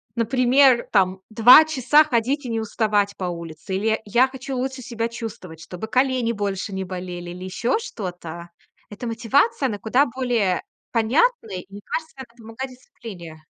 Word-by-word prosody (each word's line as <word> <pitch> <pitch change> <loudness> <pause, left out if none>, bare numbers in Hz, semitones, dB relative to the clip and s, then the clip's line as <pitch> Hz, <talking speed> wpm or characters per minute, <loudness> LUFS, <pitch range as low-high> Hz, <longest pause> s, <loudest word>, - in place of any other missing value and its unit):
например, 250 +2 +4
там 190 -2 +2
2 245 +7 +8
часа 300 0 +4
ходить 265 0 -1
и - - -4
не 225 -1 -1
уставать 210 -2 0
по 190 - -6
улице, 170 0 -5
или 195 +3 -2
я 220 - +2
я 240 +5 +3
хочу 265 0 -7
лучше 260 +1 -3
себя 230 -1 -3
чувствовать, 215 -8 -8
чтобы 180 +5 -7
колени 255 -1 +1
больше 200 -2 -3
не 190 - -3
болели 180 -1 -6
или 180 +1 -8
ещё 235 - -1
что-то. 175 - -7 0.4
Эта 210 +4 -6
мотивация, 260 - +1
она 210 -5 -2
куда 245 +7 +2
более 235 -7 0 0.3
понятная. 235 - +1
И 180 - -8
мне 205 - -9
кажется, 320 0 -4
это 240 -3 -11
помогает 225 +4 -7
дисциплине. 185 - -11
225 Hz, 165 wpm, -22 LUFS, 190-255 Hz, 0.4 s, 2